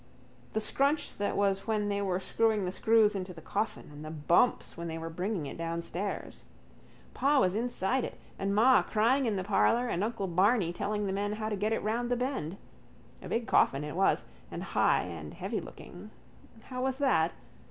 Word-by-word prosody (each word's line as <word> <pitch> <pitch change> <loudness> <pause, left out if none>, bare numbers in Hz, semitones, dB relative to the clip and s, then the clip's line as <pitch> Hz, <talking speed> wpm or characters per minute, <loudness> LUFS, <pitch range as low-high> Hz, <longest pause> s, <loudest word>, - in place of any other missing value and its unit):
The 220 - +1
scrunch 280 +7 +1
that 205 - -1
was 195 0 +1
when 215 -2 0
they 200 0 -1
were 190 -2 0
screwing 215 0 +1
the 180 - -2
screws 220 +1 +3
into 185 -2 -5
the - - -9
coffin: 210 -2 -3
and 145 +1 -9
the 155 - -6
bumps 160 +9 +2
when 170 0 -5
they 165 0 -4
were 165 0 -5
bringing 180 0 -2
it 140 - -7
downstairs. 170 +4 -4 0.7
Pa 285 +1 +3
was 185 -6 +3
inside 240 +2 0
it - - -5 0.2
and 200 +1 0
ma 250 +5 +6
crying 245 +5 +2
in 215 - 0
the 190 - -2
parlour 230 +5 +2
and 190 -5 -1
uncle 215 -2 -2
Barney 185 +1 +2
telling 205 +2 -2
the 190 - -1
men 205 +1 -1
how 215 0 -3
to 210 - -1
get 210 +2 -1
it 225 - -1
round 235 +3 -1
the 245 - +1
bend. 245 - -3 0.6
A - - -8
big 230 0 -1
coffin 135 -8 +3
it 150 +1 -5
was, 195 +2 +2 0.2
and - - -5
high - - +2
and - - -7
heavylooking. - - -6 0.5
How 255 -1 -5
was 265 0 0
that? 215 - +2
205 Hz, 195 wpm, -30 LUFS, 180-230 Hz, 0.7 s, ma